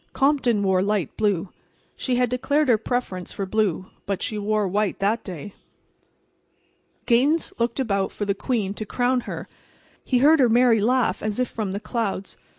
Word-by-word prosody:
Compton 270 -7 +2
wore 190 -1 +2
light 200 -5 -1
blue. 200 -4 0 0.5
She 255 - -1
had 250 0 +2
declared 285 +3 +1
her 225 -3 +4
preference 220 -6 -3
for 195 - -4
blue, 190 -3 -1 0.2
but 200 -2 -2
she 215 - -2
wore 210 0 0
white 205 +1 0
that 210 +4 0
day. 185 +1 -8 1.5
Gaines 275 +7 +2
looked 235 +2 0
about 200 -7 0
for 205 - -4
the 200 - +1
queen 205 -2 -2
to 215 - -6
crown 250 +2 +1
her. - - -6 0.6
He 255 - +1
heard 300 +5 +5
her 250 -3 +5
merry 235 -1 +4
laugh, 230 -4 +1
as 215 +2 -2
if 250 - +1
from 210 -4 -3
the 200 - -3
clouds. 215 -3 -3
215 Hz, 170 wpm, -24 LUFS, 200-250 Hz, 1.5 s, heard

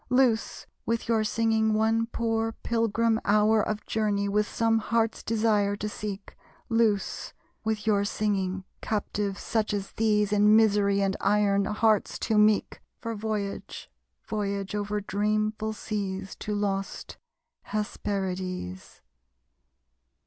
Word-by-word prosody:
Loose, 250 -3 +2 0.2
with 230 0 -1
your 225 -2 +2
singing, 220 0 +1
one 225 +1 +2
poor 225 -1 -1
pilgrim 230 0 +1
hour 215 +1 +4
Of 210 0 -3
journey, 205 -2 0
with 210 +1 +1
some 225 -1 +2
Heart's 225 0 0
Desire 215 -2 +1
to 210 - -4
seek. 210 -1 -6 0.3
Loose, 225 -4 +1 0.3
with 220 -1 -2
your 205 -2 +3
singing, 195 -2 -1 0.2
captives 205 -2 -2
such 215 -2 0
as 200 -1 -4
these 210 -2 +1
In 210 +1 +5
misery 205 -2 +4
and 195 0 +1
iron, 200 -1 +3
hearts 215 0 +1
too 220 -2 +1
meek, 210 0 +3 0.2
For 230 -1 -4
voyage 210 -2 -4 0.4
voyage 200 -2 -2
over 210 0 -2
dreamful 215 +2 -1
seas 195 -3 -4
To 210 - -3
lost 195 -1 -3 0.5
Hesperides. 185 - -4
210 Hz, 120 wpm, -27 LUFS, 200-220 Hz, 0.5 s, In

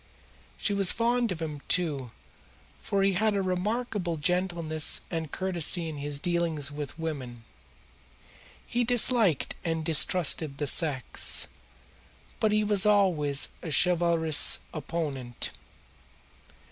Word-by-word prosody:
She 205 - -1
was 195 -2 +4
fond 235 -1 0
of 165 -2 -4
him, 150 -3 -6
too, 150 -8 +1 0.7
for 195 -1 -1
he 195 0 +2
had 215 +3 +1
a 200 - 0
remarkable 185 -1 -2
gentleness 170 -1 +1
and 160 -3 -4
courtesy 175 -2 -1
in 155 -2 -6
his 145 0 -4
dealings 165 -3 -1
with 145 0 -7
women. 135 -8 -6 1.2
He 245 +1 -1
disliked 235 - +2
and 165 -2 -2
distrusted 155 -1 +3
the 145 - -2
sex, 140 -3 +1 0.9
but 215 - +2
he 215 0 +2
was 205 -2 +2
always 175 -9 +3
a 170 - -6
chivalrous 170 -2 +3 0.2
opponent. 145 -6 -4
170 Hz, 115 wpm, -27 LUFS, 150-195 Hz, 1.2 s, was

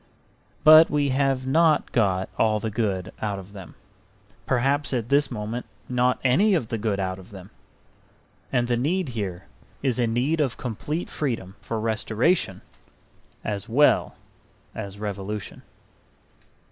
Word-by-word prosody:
But 155 +1 +9
we 145 -1 +1
have 135 -1 +1
not 155 +2 +3
got 95 -5 +1
all 110 -1 +2
the 110 +1 -3
good 100 -5 -2
out 105 -2 -2
of 95 +1 -11
them, 95 -4 -11 0.7
perhaps 135 +2 +1
at 120 -1 -2
this 145 +1 +3
moment 110 +3 -5 0.2
not 125 0 +2
any 185 +11 +4
of 125 -10 -1
the 115 - -2
good 105 -2 -1
out 95 0 -2
of 95 - -14
them. 95 -2 -12 1.0
And 120 -1 +1
the 120 -1 +1
need 160 +6 0
here 100 -7 -4 0.4
is 130 -3 0
a 120 - +2
need 130 +8 +1
of 135 -5 -1
complete 145 - -4
freedom 115 -10 -3
for 115 - -3
restoration 110 - 0 0.8
as 100 +1 -4
well 145 +6 +3 0.6
as 100 -2 -7
revolution. 105 0 -5
115 Hz, 140 wpm, -25 LUFS, 105-140 Hz, 1.0 s, But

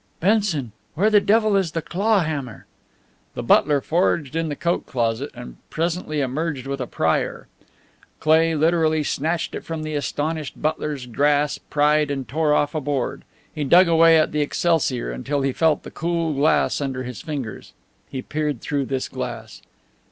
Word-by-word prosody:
"Benson, 190 - +1 0.2
where 205 +7 +2
the 210 -1 +6
devil 215 +1 +3
is 185 -5 +1
the 165 - -1
claw 200 +4 +1
hammer?" 140 - -4 0.7
The - - -4
butler 145 -1 +4
foraged 160 -3 0
in 165 -1 -1
the 145 - -3
coat 170 +4 -1
closet 120 +2 -1
and - - -10
presently 165 -2 -2
emerged 140 0 -2
with 135 0 -4
a 125 - -3
prier. 80 -6 -1 0.7
Cleigh 160 +1 +3
literally 160 0 +2
snatched 160 +4 -1
it - - -5
from 160 -1 -5
the 155 0 -4
astonished 150 +1 -3
butler's 150 -3 -2
grasp, 145 +4 0
pried 150 0 +3
and 135 -3 -3
tore 155 +4 0
off 145 0 +2
a 155 - -2
board. 140 -2 -2 0.3
He 150 - -3
dug 175 +6 +6
away 165 0 +6
at 155 - +2
the 150 - 0
excelsior 145 - 0
until 140 - -2
he 135 -1 0
felt 160 0 +2
the - - -9
cool 170 -1 -1
glass 145 +1 +2
under 130 -2 -3
his 125 -1 -7
fingers. 135 -9 -6 0.4
He 130 -1 -5
peered 150 -4 -2
through 140 +1 -2
this 130 0 -2
glass. - - -6
150 Hz, 165 wpm, -22 LUFS, 135-165 Hz, 0.7 s, the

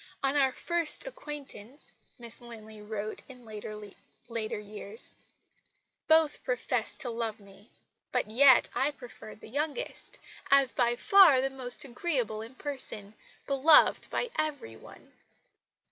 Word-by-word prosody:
"On 270 +1 +2
our 270 -2 +4
first 340 - +1
acquaintance," 290 - -9 0.3
Miss 235 -1 -8
Linley 220 -3 -11
wrote 210 0 -5
in 250 -2 -13
later 215 +1 -7
years, 210 +1 -8 0.9
"both 315 -1 +4
professed 250 -2 -2
to 245 - -4
love 225 -2 -3
me 200 +2 -18 0.4
but - - +1
yet 260 +3 +6
I 270 - +2
preferred 245 -6 -12
the - - -11
youngest, 295 - -4 0.3
as 275 -2 +5
by 240 -1 +2
far 350 -1 +6
the 270 +1 0
most 255 0 -6
agreeable 245 -5 -2
in 230 +4 -10
person, 255 -8 -5 0.3
beloved 280 +3 +5
by 485 - -2
every 290 - -2
one." - - -16
245 Hz, 125 wpm, -29 LUFS, 220-285 Hz, 0.9 s, yet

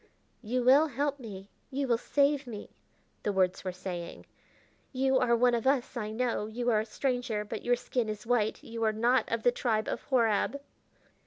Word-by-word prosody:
"You 245 +2 -1
will 275 +5 +6
help 285 +1 -2
me, 200 -5 -9 0.2
you 275 +1 -2
will 235 -2 +2
save 285 +1 +1
me," 215 -4 -8 0.5
the 205 - 0
words 185 -2 +1
were 185 - -2
saying. 180 -1 -7 0.7
"You 265 0 +2
are 235 -2 +3
one 245 +1 +3
of 235 +1 0
us, 270 -1 +1
I 215 -3 -3
know. 230 -1 -1
You 240 +2 -1
are 215 - +3
a 215 - -2
stranger, 245 -3 -1
but - - -5
your 245 0 +3
skin 245 -2 -2
is 215 +1 -5
white; 225 -3 0
you 230 0 -5
are 220 -1 +2
not 235 +2 +2
of 230 -1 -1
the 245 - +5
tribe 220 -3 0
of - - -3
Horab." 235 +1 +2
235 Hz, 190 wpm, -30 LUFS, 215-255 Hz, 0.7 s, will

